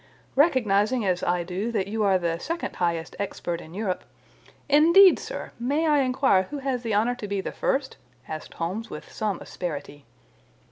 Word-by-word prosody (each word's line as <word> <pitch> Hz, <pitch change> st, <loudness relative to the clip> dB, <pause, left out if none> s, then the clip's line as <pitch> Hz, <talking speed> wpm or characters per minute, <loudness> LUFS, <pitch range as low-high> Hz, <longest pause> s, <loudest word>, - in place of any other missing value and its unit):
Recognizing, 240 Hz, -, +3 dB
as 180 Hz, -1 st, +1 dB
I 175 Hz, 0 st, 0 dB
do, 190 Hz, +6 st, -3 dB
that 195 Hz, -3 st, 0 dB
you 220 Hz, +2 st, -2 dB
are 195 Hz, -2 st, +4 dB
the 170 Hz, -2 st, -2 dB
second 335 Hz, -, -4 dB
highest 170 Hz, -2 st, -1 dB
expert 175 Hz, -4 st, -3 dB
in 160 Hz, +3 st, -12 dB
Europe—" 200 Hz, -3 st, -2 dB, 0.6 s
"Indeed, 335 Hz, +6 st, +7 dB
sir! -, -, -6 dB
May 285 Hz, +7 st, 0 dB
I 300 Hz, -2 st, +4 dB
inquire 255 Hz, -8 st, +2 dB
who 295 Hz, -, -4 dB
has 265 Hz, -3 st, -2 dB
the 225 Hz, -3 st, -1 dB
honour 225 Hz, +4 st, +2 dB
to 235 Hz, -4 st, -7 dB
be 200 Hz, 0 st, -2 dB
the -, -, -4 dB
first?" 270 Hz, 0 st, -1 dB, 0.3 s
asked 155 Hz, -1 st, -7 dB
Holmes 195 Hz, +7 st, -3 dB
with -, -, -9 dB
some 210 Hz, -4 st, -2 dB
asperity. 145 Hz, -4 st, -6 dB
210 Hz, 175 wpm, -25 LUFS, 180-265 Hz, 0.6 s, Indeed